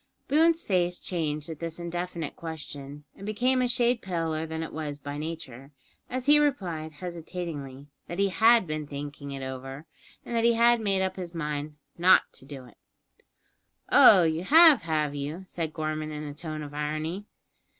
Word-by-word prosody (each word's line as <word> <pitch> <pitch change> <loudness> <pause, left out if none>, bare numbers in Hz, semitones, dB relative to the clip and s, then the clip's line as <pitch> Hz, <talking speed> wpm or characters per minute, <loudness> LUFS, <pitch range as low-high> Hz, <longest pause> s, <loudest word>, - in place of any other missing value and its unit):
Boone's 325 +3 +3
face 180 -2 +1
changed 155 -4 -3
at 160 -2 -7
this 165 0 -5
indefinite 170 -2 -4
question, 150 -3 -8
and - - -12
became 250 +5 +1
a 250 - +2
shade 245 -1 +1
paler 165 -3 -2
than 160 0 -4
it 160 - -7
was 150 -2 -4
by 145 0 -7
nature, 150 -4 -7 0.4
as 255 0 -3
he 295 +1 +6
replied, 180 - -1
hesitatingly, 160 -5 -6 0.2
that 175 - -6
he 200 0 +2
had 225 +4 +5
been 155 -2 -4
thinking 145 0 -7
over 130 0 -6
it, - - -23 0.4
and 240 - -4
that 230 - +2
he 235 0 +5
had 235 0 +4
made 195 -3 +1
up 190 0 -2
his 175 -2 -6
mind 150 -1 -3 0.2
not 185 +2 +6
to 130 - -13
do 135 -2 -9
it. 120 - -18 1.1
"Oh, 185 - +8
you 160 +1 0
have, 315 - +7
have 155 -3 -1
you?" 145 +6 -5
said 165 -4 -4
Gorman 155 0 -3
in 150 0 -6
a 145 -1 -6
tone 155 0 -6
of 145 0 -9
irony. 155 +6 -3
165 Hz, 175 wpm, -27 LUFS, 150-190 Hz, 1.1 s, Oh